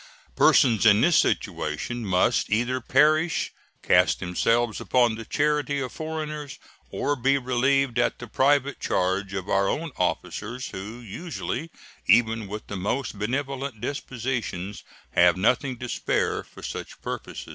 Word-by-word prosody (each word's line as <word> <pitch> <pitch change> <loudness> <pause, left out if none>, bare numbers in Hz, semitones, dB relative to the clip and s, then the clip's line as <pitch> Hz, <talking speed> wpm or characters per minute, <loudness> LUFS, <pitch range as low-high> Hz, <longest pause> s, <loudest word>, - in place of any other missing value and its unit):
Persons 115 -6 +5
in 105 -1 +6
this 170 0 +4
situation 95 +11 -1
must 95 +6 +2
either 120 +4 0
perish, 155 +6 +2 0.3
cast - - +4
themselves 115 +5 0
upon 120 -2 +3
the 115 0 -7
charity 145 +1 0
of 130 -3 -3
foreigners, 155 -2 -5 0.3
or 145 +1 -1
be 135 +1 +2
relieved 130 0 +1
at 120 - +1
the 120 - -8
private 140 +4 +2
charge 95 +2 -1
of 95 0 -4
our 100 -1 +2
own 165 0 -2
officers, 110 +7 -2
who 105 +5 -7
usually, 160 - -5 0.4
even 115 -2 +3
with 105 +2 -6
the 100 - -6
most 105 +3 -2
benevolent 135 +2 -3
dispositions, 115 -7 -4 0.3
have 90 +1 +5
nothing 125 +6 +1
to 120 - -6
spare - - -1
for - - -15
such - - -6
purposes. - - -6
120 Hz, 135 wpm, -25 LUFS, 105-140 Hz, 0.4 s, in